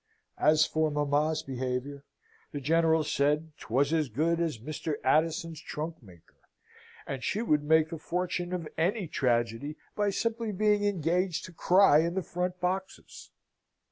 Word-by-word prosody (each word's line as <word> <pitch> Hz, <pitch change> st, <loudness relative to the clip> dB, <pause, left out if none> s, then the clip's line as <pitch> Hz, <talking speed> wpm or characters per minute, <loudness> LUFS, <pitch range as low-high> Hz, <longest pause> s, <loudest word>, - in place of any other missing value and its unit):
As 155 Hz, +1 st, +5 dB
for 155 Hz, 0 st, 0 dB
mamma's 150 Hz, +2 st, 0 dB
behaviour, 130 Hz, +1 st, -4 dB, 0.5 s
the 145 Hz, -, -4 dB
General 160 Hz, +2 st, +3 dB
said, 150 Hz, +2 st, 0 dB
'twas 140 Hz, +6 st, 0 dB
as 155 Hz, -4 st, +1 dB
good 165 Hz, +8 st, 0 dB
as 165 Hz, -7 st, -1 dB
Mr. 150 Hz, +5 st, -4 dB
Addison's 160 Hz, +3 st, +1 dB
trunk 160 Hz, +2 st, -6 dB
maker, 90 Hz, -7 st, -19 dB, 0.7 s
and 135 Hz, -2 st, -5 dB
she 215 Hz, -, -1 dB
would 150 Hz, -9 st, +2 dB
make 160 Hz, +2 st, +3 dB
the 165 Hz, -, -5 dB
fortune 180 Hz, +1 st, -2 dB
of 175 Hz, -3 st, -3 dB
any 185 Hz, +3 st, 0 dB
tragedy 120 Hz, +1 st, 0 dB, 0.2 s
by 205 Hz, -1 st, +1 dB
simply 230 Hz, +2 st, -2 dB
being 210 Hz, +1 st, +2 dB
engaged 180 Hz, -2 st, 0 dB
to 185 Hz, -, -11 dB
cry 180 Hz, -2 st, +5 dB
in 170 Hz, +2 st, 0 dB
the 190 Hz, -, -1 dB
front 180 Hz, +1 st, -3 dB
boxes. 185 Hz, +2 st, -4 dB
160 Hz, 145 wpm, -29 LUFS, 145-180 Hz, 0.7 s, As